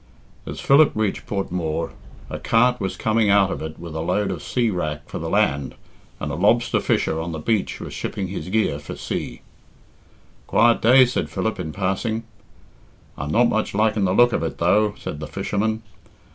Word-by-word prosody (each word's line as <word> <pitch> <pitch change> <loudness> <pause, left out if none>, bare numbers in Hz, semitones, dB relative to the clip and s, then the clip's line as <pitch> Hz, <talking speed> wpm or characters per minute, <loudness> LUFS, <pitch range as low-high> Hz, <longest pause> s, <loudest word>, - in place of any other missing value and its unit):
As - - -6
Philip 145 +2 +5
reached 110 -2 -1
Port 100 -3 -3
Mooar, 85 -2 -2 0.4
a - - -6
cart 125 +2 +3
was 95 -1 -3
coming 110 -1 +2
out 100 -1 +4
of - - -4
it 80 0 -6
with 85 -2 -8
a 80 - -4
load 90 +5 0
of - - -5
sea 120 -3 0
wrack 75 -5 -3
for - - -6
the - - -4
land, 70 -1 +1 0.4
and 75 - -3
a - - -4
lobster 105 +8 +2
fisher 80 - 0
on 85 0 -4
the - - -4
beach 105 +6 -1
was - - -7
shipping 100 -4 -4
his 95 -1 -5
gear 105 -8 +1
for 75 - -8
sea. - - -5 1.1
"Quiet 115 +1 +4
day," 130 +3 +7
said 125 - -2
Philip 110 -3 -2
in 80 -3 -4
passing. 100 +5 -2 0.9
"I'm 70 - -5
not 120 +1 +4
much 110 -2 -1
liking 105 -1 +2
the 90 0 +1
look 120 +1 +5
of - - 0
it, 80 - -3
though," 105 +5 +2
said 75 - -6
the 75 - -5
fisherman. 105 +5 -2
100 Hz, 190 wpm, -22 LUFS, 85-110 Hz, 1.1 s, day